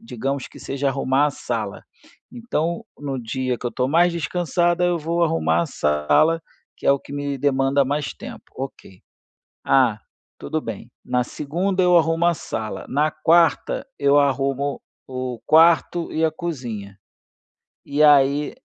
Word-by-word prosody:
digamos 135 - -4
que - - -14
seja 140 +1 -2
arrumar 135 +1 +1
a - - -1
sala, 115 -6 -4 0.5
então: 225 -5 -3
"No 135 -3 -4
dia 125 +2 -2
que - - -5
eu 120 - -2
estou 125 0 -1
mais 170 +4 +3
descansada, 175 +1 0
eu 175 -1 +1
vou 170 +2 0
arrumar 80 - +1
a - - -3
sala, 75 - +2 0.4
que - - -7
é - - +7
o 140 - 0
que - - -12
me 145 -1 -3
demanda 135 0 +2
mais 145 +2 -2
tempo, - - -10
ok, 130 -8 -8 0.6
ah, 125 -6 +3 0.4
tudo 155 - -3
bem. 115 -3 -7 0.2
Na 125 0 0
segunda 180 +8 -2
eu 180 -1 +5
arrumo 165 +1 +1
a 175 - +3
sala, 110 -6 -5
na 150 +3 +1
quarta 170 - +2
eu 140 0 +4
arrumo 140 0 0 0.3
o 125 -2 -5
quarto 165 +1 +4
e 160 +1 0
a 160 - +3
cozinha". 120 - -6 0.9
E 145 +2 +1
aí 145 - +4
145 Hz, 155 wpm, -22 LUFS, 130-165 Hz, 0.9 s, é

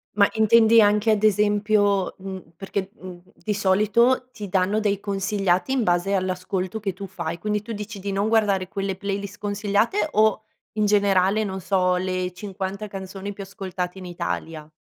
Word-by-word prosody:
Ma 200 -1 +5
intendi 225 0 +6
anche 210 +2 +3
ad 215 0 +1
esempio 205 -1 +2
mhmm, 190 -3 -9
perché, 195 0 -4
mhmm, 185 -1 -9 0.2
di 210 - -3
solito 215 +6 +2
ti 205 -5 -8
danno 190 +3 +1
dei 205 -2 0
consigliati 195 +1 0
in 255 - +1
base 175 +1 +1
all'ascolto 185 +1 -2
che 200 -3 -3
tu 195 +2 -7
fai. 170 -3 -5
Quindi 210 +4 -2
tu 230 +3 -9
dici 210 0 -6
di 200 +1 -4
non 200 +2 0
guardare 205 -4 +2
quelle 195 -1 -3
playlist 200 +1 -4
consigliate, 205 - 0
o 215 0 +3 0.3
in 215 -1 +1
generale, 200 0 +3
non 190 -2 -4
so, 180 -1 +2
le 185 0 -2
50 195 +1 -5
canzoni 195 0 -7
più 200 - -7
ascoltate 190 -2 -5
in 185 - -9
Italia? 165 -3 -5
200 Hz, 165 wpm, -23 LUFS, 185-210 Hz, 0.3 s, intendi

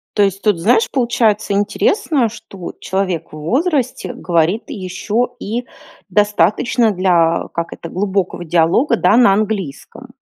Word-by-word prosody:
То 205 - +4
есть, 195 0 0
тут, 210 -5 +2
знаешь, 225 +5 +3
получается 230 -5 +1
интересно, 260 - +1
что 210 -5 -9
человек 185 -4 -2
в - - -8
возрасте 260 - -1
говорит 175 +5 0
ещё 220 +2 -3
и 235 +4 -4 0.4
достаточно 210 +3 +2
для, 175 -3 +2
как 170 0 -3
это, 170 - -9
глубокого 190 -2 -2
диалога, 175 - +2
да, 180 +5 +3
на 240 -6 +6
английском. 210 - -3
205 Hz, 130 wpm, -17 LUFS, 180-235 Hz, 0.4 s, на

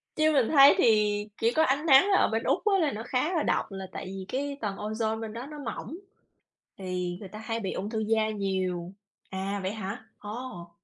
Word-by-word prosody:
Chứ 310 0 +3
mình 265 -6 +3
thấy 280 -2 +8
thì 210 -2 +3 0.2
chỉ 230 +1 +3
có 315 - +4
ánh 285 +1 +1
nắng 285 +5 +7
ở - - +4
bên 225 +1 -1
Úc - - 0
á 405 -2 +4
là 310 -5 +2
nó 220 -1 -5
khá 255 +8 0
là 325 - +1
độc - - 0
là 195 -1 -6
tại - - -6
vì 190 0 -6
cái 280 +4 -3
tầng 205 -3 -2
ozone 220 +1 -2
bên 220 -1 -5
đó 235 +3 -6
nó 300 +1 -9
mỏng, 285 +4 -6 0.8
thì 180 -2 -3
người 200 - -8
ta 210 - -9
hay 225 +1 -3
bị 195 -3 -3
ung 205 - -4
thư 220 - -2
da 220 0 +1
nhiều. 185 -4 -2 0.4
À, 195 +1 -3
vậy 190 +1 -2
hả? 215 +1 -6
Ồ. 210 -5 -7
220 Hz, 220 wpm, -28 LUFS, 195-265 Hz, 0.8 s, thấy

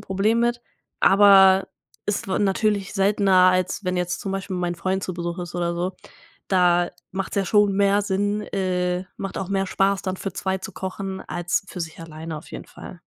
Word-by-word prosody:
Problem 210 +5 +1
mit, 240 0 +1 0.4
aber 195 -1 +6 0.4
ist 205 0 -1
natürlich 200 +1 0
seltener, 195 -2 +4
als 185 +2 -1
wenn 180 0 -1
jetzt 180 0 -2
zum 195 - -4
Beispiel 190 -1 -4
mein 175 -1 -1
Freund 190 +2 -2
zu 185 - -4
Besuch 170 0 -4
ist 175 -1 -6
oder 170 -1 -1
so. 180 +2 -2 0.6
Da 175 -2 +3 0.2
macht's 195 +1 -4
ja 195 - +2
schon 205 0 +3
mehr 200 +1 +3
Sinn 205 +1 0
äh, 180 -1 -1
macht 195 - -5
auch 190 -1 -4
mehr 195 -1 0
Spaß 195 +1 +1
dann 185 -1 -3
für 195 -1 -5
2 190 +1 -2
zu 190 +1 -8
kochen 190 +1 -5
als 175 +3 -1
für 180 - -7
sich 160 -1 -6
alleine 160 0 -7
auf - - -14
jeden - - -7
Fall. - - -11
190 Hz, 185 wpm, -23 LUFS, 180-195 Hz, 0.6 s, aber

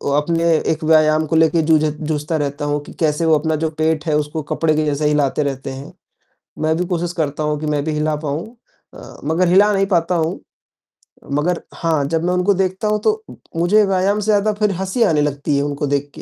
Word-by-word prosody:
अपने 165 +3 0 0.3
एक 160 +1 -3
व्यायाम 155 0 +4
को 160 - -1
लेके 160 +1 +4
जूझ 155 -1 +3
जूझता 155 +1 -2
रहता 145 0 -3
हूँ 145 0 0
कि - - -12
कैसे 155 0 +1
वो 160 -1 +4
अपना 160 +1 -1
जो 160 - +1
पेट 155 -1 0
है, 155 -2 +1
उसको 150 +1 -3
कपड़े 155 -1 +1
के 155 0 +1
जैसे 150 0 -1
हिलाते 150 0 +1
रहते 135 -1 -4
हैं, 135 +1 -9 0.7
मैं 155 +1 +1
भी 180 - -1
कोशिश 175 -1 -2
करता 150 0 -1
हूँ 150 0 -1
कि 155 - -4
मैं 145 -1 -1
भी 155 - -2
हिला 150 0 0
पाऊँ 150 +6 -3 0.5
अ, - - -12
मगर 170 +4 +1
हिला 200 +4 +5
नहीं 195 -1 +1
पाता 180 -2 +1
हूँ। 165 -1 -1 0.9
मगर 165 +5 0
हाँ, 160 -4 0
जब 165 0 0
मैं 180 - +1
उनको 180 +3 +2
देखता 190 +2 -1
हूँ, 210 0 +1
तो 435 - 0 0.3
मुझे 185 +6 +4
व्यायाम 195 +2 +1
से 210 - -3
ज़्यादा 215 0 +2
फिर 210 0 0
हँसी 190 +6 0
आने 155 -7 +2
लगती 145 0 -1
है 140 - +1
उनको 145 0 -2
देख 145 0 -1
के, - - -9
160 Hz, 220 wpm, -19 LUFS, 150-180 Hz, 0.9 s, हिला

